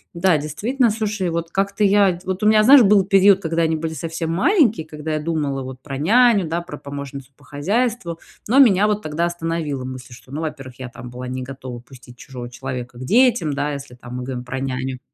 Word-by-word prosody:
да, 170 -2 +3
действительно. 225 - 0
Слушай, 210 -4 -2
вот 170 0 -3
как-то 195 +2 0
я 200 -3 +4
Вот 190 0 -3
у 210 - +4
меня, 215 0 +5
знаешь, 270 +4 +8
был 200 -2 +4
период, 195 0 +5
когда 165 -1 -1
они 160 0 +1
были 160 0 -3
совсем 165 0 -4
маленькие, 225 - +2
когда 155 0 -5
я 155 - 0
думала 150 -4 -2
вот 130 0 -9
про 135 -1 -6
няню, 215 - +4
да, 170 +1 -1
про 170 -4 -9
помощницу 140 -1 -8
по 145 - -22
хозяйству. 180 - -1 0.3
Но 245 - +2
меня 210 -5 +6
вот 210 0 0
тогда 155 +2 -1
остановила 165 -5 -3
мысль, 130 -1 -8
что, 120 +2 -15
ну, 150 +3 -4
во-первых, 135 -6 -6
я 130 -1 -6
там 120 0 -10
была 125 +1 -7
не 130 0 -4
готова 130 -2 -8
пустить 125 0 -16
чужого 125 -3 -9
человека 125 -1 -6
к - - -6
детям, 230 - +3
да, 145 +1 -2
если 140 -2 -8
там 125 0 -10
мы 125 - -4
говорим 125 -1 -5
про 130 +1 -4
няню. 130 -1 -3
160 Hz, 215 wpm, -21 LUFS, 130-195 Hz, 0.3 s, знаешь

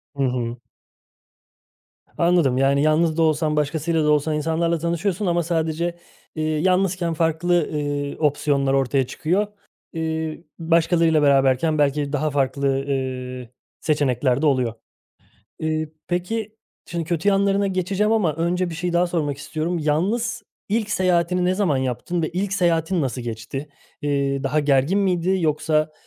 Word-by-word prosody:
Hı 140 - 0
hı. 125 -2 -1 1.6
Anladım. 170 -7 +3
Yani, 140 +1 +3
yalnız 155 +1 +2
da - - +2
olsan, 155 -1 +1
başkasıyla 155 +2 0
da 150 - +3
olsan 150 +1 +1
insanlarla 165 +2 0
tanışıyorsun 170 +4 -1
ama 175 -1 +1
sadece, 165 +1 -1 0.4
iii, 155 0 -1
yalnızken 185 -2 +1
farklı, 165 +1 +1
ııı, 145 -1 -2
opsiyonlar 145 -2 +1
ortaya 135 -1 +1
çıkıyor. 185 +6 0 0.5
İii, 160 0 -3
başkalarıyla 165 -1 +3
beraberken 140 +2 +3
belki 145 0 +1
daha 150 +1 0
farklı, 140 0 0 0.2
ııı, 130 -2 -3 0.3
seçenekler 135 -3 +1
de - - +1
oluyor. 130 -5 +2 0.9
Iıı, 155 0 -1 0.2
peki, 215 +5 -2 0.3
şimdi 170 -2 -3
kötü 170 +3 -1
yanlarına 200 0 +2
geçeceğim 195 +3 0
ama 180 -10 +2
önce 175 +2 -1
bir - - -6
şey 175 +1 -2
daha 175 +1 +3
sormak 155 -5 -1
istiyorum. 160 +4 -3
Yalnız 195 +11 0 0.3
ilk 215 0 0
seyahatini 180 -1 +1
ne 185 +1 +2
zaman 185 -9 +1
yaptın 130 +7 -2
ve 160 - 0
ilk 190 +3 -2
seyahatin 170 -1 +1
nasıl 130 -1 -2
geçti? 120 +5 -6 0.3
İii, 140 -1 0
daha 150 +3 +1
gergin 145 +6 +2
miydi 185 -1 +1
yoksa, 155 0 +1
160 Hz, 140 wpm, -22 LUFS, 145-175 Hz, 1.6 s, Anladım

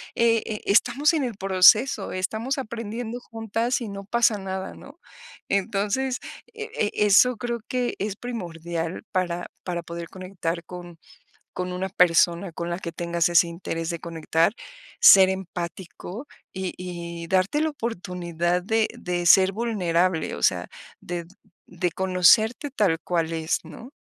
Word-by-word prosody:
e 230 -1 +3
e 215 -2 -5
estamos 250 +9 +3
en 305 -4 +1
el 235 -4 -4
proceso, 195 +4 +4
estamos 220 +9 -2
aprendiendo 230 0 -5
juntas 225 +2 -2
y 230 - -4
no 200 0 -7
pasa 230 0 +2
nada, 190 0 -5
¿no? 285 +5 -14 0.5
Entonces, 210 +6 0 0.4
e 445 0 -7 0.2
e 210 - +2
eso 235 +4 +5
creo 235 +1 -3
que 250 -1 -1
es 200 0 -2
primordial 170 -7 -5
para 175 -1 -1 0.2
para 175 -2 -3
poder 170 0 -7
conectar 180 -3 -5
con 175 -1 -10 0.6
con 180 0 -3
una 190 +1 -3
persona 175 0 +3
con 170 +1 -4
la 170 - -3
que 170 - -5
tengas 170 0 0
ese 170 0 +5
interés 165 -1 -4
de 170 - -5
conectar, 165 +2 0 0.5
ser 190 -1 +9
empático, 185 - -6 0.3
y 190 -1 -4
y 170 -2 -6
darte 190 - +1
la 315 - +1
oportunidad 180 - -2
de 220 +3 +1
de 175 -1 -3
ser 190 +2 +7
vulnerable, 185 -6 0
o - - -8
sea, - - +2 0.4
de 175 -1 -5 0.4
de 175 0 -2
conocerte 205 - +3
tal 195 -10 +2
cual 165 -2 -1
es, 160 0 -1
¿no? 230 - -11
190 Hz, 145 wpm, -24 LUFS, 170-225 Hz, 0.6 s, ser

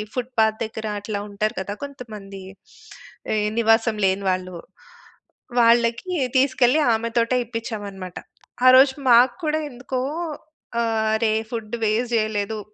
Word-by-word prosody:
Footpath 230 -4 0
దగ్గర 220 0 -6
అట్లా 205 0 -4
ఉంటారు 210 +2 -2
కదా! 200 +2 -5
కొంతమంది. 215 -8 -9 0.9
ఎ - - +1 0.2
నివాసం 225 0 +3
లేని 190 +1 0
వాళ్ళు. 185 -1 -4 1.0
వాళ్ళకి 235 +8 +3 0.3
తీసుకెళ్ళి 260 +2 +3
ఆమెతోటే 230 +2 0
ఇప్పిచ్చామన్నమాట. 205 -6 -6 0.5
ఆరోజు 260 +1 +7 0.2
మాకు 240 +1 +6
కూడా 310 0 +1
ఎందుకో, 255 +1 -4 0.8
"ఆరే! 220 -1 +1 0.2
ఫుడ్ 225 -1 -4
వేస్ట్ 225 +3 0
జేయలేదు. 215 -1 -1
225 Hz, 105 wpm, -22 LUFS, 210-245 Hz, 1.0 s, ఆరోజు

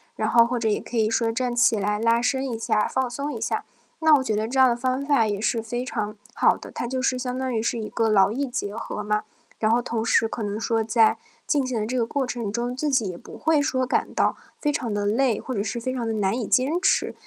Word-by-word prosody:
然 - - -1
后 235 -1 +5
或 245 0 -1
者 225 -1 -1
也 210 - +1
可 240 - -6
以 220 -1 +3
说 225 0 +1
站 245 +1 -2
起 235 -2 +4
来 210 +1 -1
拉 230 +1 +3
伸 265 +2 0
一 230 - -3
下， 215 -1 +1
放 260 -1 0
松 280 +4 -4
一 230 - -5
下， 225 - -2 0.4
那 315 -1 +7
我 265 - +1
觉 220 -5 -1
得 215 +1 -1
这 265 +3 -1
样 260 - +8
的 235 - +2
方 255 +3 -1
法 280 -6 +3
也 205 -1 -2
是 225 +1 0
非 240 +3 -4
常 215 -3 -3 0.2
好 - - +3
的， - - -11
它 240 - -4
就 260 +1 -2
是 255 -1 +1
相 250 0 -3
当 260 -1 -2
于 220 - 0
是 230 +1 -1
一 215 - -4
个 225 -1 0
劳 200 -1 +4
逸 275 +4 -2
结 210 -5 -4
合 215 -2 -5
嘛。 210 0 0 0.4
然 215 0 +2
后 235 - +4
同 230 -2 -2
时 225 - +3
可 225 - -6
能 210 0 -3
说 225 0 0
在 225 0 +3 0.3
进 285 -4 +1
行 240 -3 -2
的 - - -1
这 250 +3 -3
个 240 - +2
过 265 +4 -1
程 235 -5 -4
中， 240 +2 -2
自 295 +3 -1
己 250 -7 +2
也 175 - -6
不 - - -12
会 315 -1 +2 0.3
感 - - 0
到 - - +2 0.2
非 295 - +1
常 255 -6 -3
地 205 0 -1
累， 230 +2 +2
或 260 - -5
者 200 - -1
是 215 +3 -3
非 255 +2 -3
常 240 -3 -3
地 225 - -1
难 200 -2 0
以 225 - -3
坚 290 +8 +2
持。 385 - +2
235 Hz, 295 characters per minute, -24 LUFS, 220-255 Hz, 0.4 s, 样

